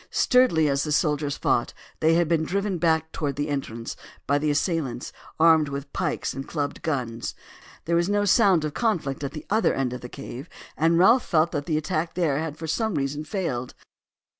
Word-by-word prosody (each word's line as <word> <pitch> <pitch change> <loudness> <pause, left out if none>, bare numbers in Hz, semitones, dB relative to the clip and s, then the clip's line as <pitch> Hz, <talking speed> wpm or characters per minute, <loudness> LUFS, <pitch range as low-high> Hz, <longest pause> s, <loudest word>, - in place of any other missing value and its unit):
Sturdily 250 - +3
as 140 -1 +1
the 150 - -3
soldiers 150 -2 +1
fought - - 0 0.2
they 160 +1 +4
had 170 -1 +3
been 160 -1 +2
driven 195 +2 -1
back 160 -1 +1
towards 145 -3 -2
the 145 +2 -2
entrance 115 -5 -4 0.3
by 145 +1 +2
the 150 +1 0
assailants, 145 -5 -1 0.3
armed 160 -2 +5
with 140 0 -6
pikes - - -2
and 135 0 -6
clubbed 145 -3 -3
guns. 125 -7 -3 0.5
There 170 - +1
was 170 +2 +2
no 205 0 +2
sound 195 -6 +4
of 150 - -3
conflict 165 - -1
at 140 - -4
the 155 - -8
other 220 +2 +2
end 130 -2 -1
of 125 - -6
the 125 - -8
cave, 135 +2 -8 0.3
and 165 +2 +3
Ralph 225 +8 +5
felt 160 +1 +2
that 145 -2 -3
the 155 -3 +1
attack 155 +1 -2
there 160 -6 +1
had 155 -1 -4
for 160 - -6
some 220 +5 -1
reason 145 +2 -2
failed. 140 - -3
155 Hz, 195 wpm, -25 LUFS, 140-170 Hz, 0.5 s, armed